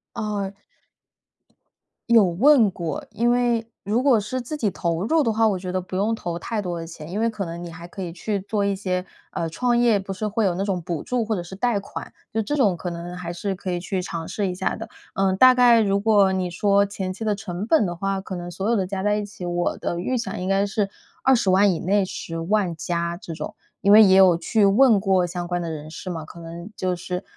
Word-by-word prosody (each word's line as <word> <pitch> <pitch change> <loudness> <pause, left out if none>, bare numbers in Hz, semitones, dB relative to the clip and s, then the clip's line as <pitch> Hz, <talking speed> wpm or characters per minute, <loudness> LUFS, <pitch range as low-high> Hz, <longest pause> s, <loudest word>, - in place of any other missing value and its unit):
哦。 205 -3 -2 1.6
有 230 -3 +6
问 225 - +5
过， 170 -4 -4
因 235 +3 +1
为 240 -2 +1 0.2
如 220 +5 0
果 265 -5 +5
是 255 +5 -3
自 300 +6 -5
己 225 -8 +1
投 170 -1 -2
入 320 +3 +3
的 230 - +1
话， 220 +1 +3
我 200 - +1
觉 180 0 -5
得 185 - 0
不 185 +1 -7
用 205 +4 +1
投 175 -6 -4
太 215 +4 -3
多 175 -3 -4
的 165 - -6
钱， 160 -2 -10
因 195 +4 -3
为 230 - +2
可 215 -3 -4
能 170 +1 -6
你 170 - -7
还 170 0 -10
可 190 - -9
以 175 -2 -4
去 200 +4 -3
做 205 0 -1
一 200 -1 +1
些 185 -1 -2 0.3
呃， 165 -1 -2
创 240 +8 +1
业 235 -3 +4
不 195 0 -6
是 200 +3 -3
会 215 +1 0
有 180 -3 +1
那 195 - -1
种 190 -3 -1
补 170 -2 -4
助 250 -2 -1
或 215 0 -1
者 175 - -3
是 190 +2 -9
贷 230 0 +1
款。 195 - -8 0.2
就 220 - +1
这 290 +8 -2
种 210 -10 +3
可 175 +1 -5
能 170 +1 -6
还 180 -1 -5
是 190 +3 -3
可 185 0 -5
以 175 - -1
去 185 +1 -3
尝 170 -2 -5
试 205 -2 -2
一 - - -3
下 190 - -1
的。 225 0 -8 0.2
嗯， 190 -1 +1
大 255 +2 +8
概 245 -2 +6
如 200 -2 +2
果 205 -3 +4
你 185 -1 -1
说 200 +3 +3
前 190 -2 -4
期 220 - -7
的 215 - +1
成 195 -1 -5
本 270 -4 +3
的 175 - -3
话， 195 +2 -2
可 190 -1 -6
能 175 0 -6
所 195 +4 -2
有 235 - +3
的 195 -4 +1
加 190 0 -4
在 210 0 +2
一 210 0 -2
起， 200 -3 -9
我 175 0 -1
的 170 - -3
预 255 +7 -1
想 230 - -4
应 185 - -2
该 195 +1 +2
是 200 0 -1 0.3
200000 205 -6 +4
以 - - -3
内、 200 +3 +2
100000 175 +1 -2
加 170 +1 -2
这 170 - -8
种。 160 - -6 0.3
因 200 - +4
为 220 +1 +10
也 190 -2 +6
有 185 -3 +6
去 215 +4 +1
问 210 +2 +5
过 190 -2 +2
相 175 0 -4
关 175 0 -1
的 170 -1 -4
人 155 -1 -7
士 180 +3 -6
嘛， 160 -2 -5
可 170 - -12
能 170 +3 -8
就 185 -1 -1
是， 180 +2 -5
195 Hz, 265 characters per minute, -23 LUFS, 175-215 Hz, 1.6 s, 为